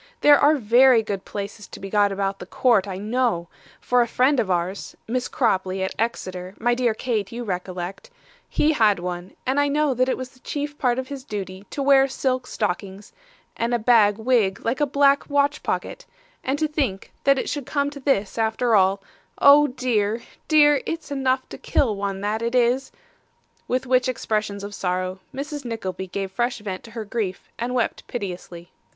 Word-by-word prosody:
There 290 -1 +7
are 295 +2 +5
very 245 -1 +5
good 200 -3 -4
places 205 0 -6
to - - -11
be 195 0 -7
got 205 -1 +3
about 195 0 -2
the 180 - -9
court, 220 -3 +2
I 190 -2 -4
know; 215 -4 -1 0.3
for 245 0 +2
a 235 - +1
friend 255 +4 +2
of 205 - 0
ours 180 +2 -2
(Miss 250 +2 -1
Cropley, 190 -7 0
at 190 - -2
Exeter, 185 -5 -3
my 240 +1 +1
dear 240 -2 +1
Kate, 220 -5 -2
you 240 +1 -5
recollect), 185 - -5 0.4
he 310 +1 +2
had 215 -7 +4
one, 175 +1 -6
and 265 +2 +1
I 285 - +3
know 295 0 +1
that 255 +1 +1
it - - 0
was 255 -1 -6
the 255 - -23
chief 290 +2 -4
part 245 -2 +2
of 260 0 -4
his 275 -2 -6
duty 195 -4 -6
to 280 - -3
wear 270 -1 +5
silk 255 -1 -1
stockings, 195 0 -4 0.4
and 235 +1 0
a - - +3
bag 215 -3 +4
wig 225 -4 +1
like 240 +6 0
a 295 - +3
black 280 +1 +3
watch 285 +1 +1
pocket; - - -4 0.4
and 265 +2 0
to 310 +1 +1
think 275 -11 -2
that 275 0 +4
it - - -2
should 285 -4 -4
come 285 -1 0
to 285 - -9
this 235 -7 0
after 225 +2 +1
all 195 -1 +3 0.3
oh, 290 +1 +7
dear, 235 -4 -1 0.2
dear, 295 -2 +5
it's 330 -2 -5
enough 265 -2 0
to - - -9
kill 225 -6 +1
one, 195 -1 -3
that 210 +2 -1
it 235 +2 -1
is!' 250 +2 +2 0.8
With 255 +1 -1
which 255 0 +2
expressions 210 -4 -2
of 205 0 -6
sorrow, 185 0 -2
Mrs. 285 +2 -5
Nickleby 190 -6 -4
gave 190 +1 -4
fresh 240 +4 -1
vent 200 -4 -6
to 230 - -12
her 220 - -4
grief, 205 -3 -4
and 245 +2 -2
wept 240 - -1
piteously. 180 -5 -6
235 Hz, 195 wpm, -23 LUFS, 195-265 Hz, 0.8 s, There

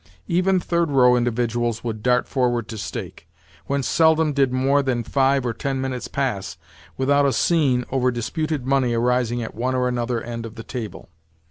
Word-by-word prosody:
Even 185 +1 +2
third 170 -2 0
row 125 -3 +5
individuals 120 -1 -1
would 110 -3 -4
dart 125 +1 +2
forward 120 -4 0
to 115 - -7
stake; 100 -5 -7 0.4
whence 140 -3 -1
seldom 160 -1 +3
did 135 -2 +2
more 135 +2 +2
than 125 -3 -1
five 135 +1 +1
or 120 - -1
ten 135 +2 -3
minutes 130 -2 -3
pass 100 - -3 0.4
without 140 +2 +3
a - - +2
scene 135 -6 +2
over 130 -1 +2
disputed 135 +4 -2
money 130 -3 +1
arising 120 0 +1
at 110 - -7
one 125 +3 -1
or 125 0 +1
another 120 -1 -1
end 115 0 -6
of 115 0 -8
the 115 - -8
table. 115 -5 -7
125 Hz, 175 wpm, -22 LUFS, 120-140 Hz, 0.4 s, row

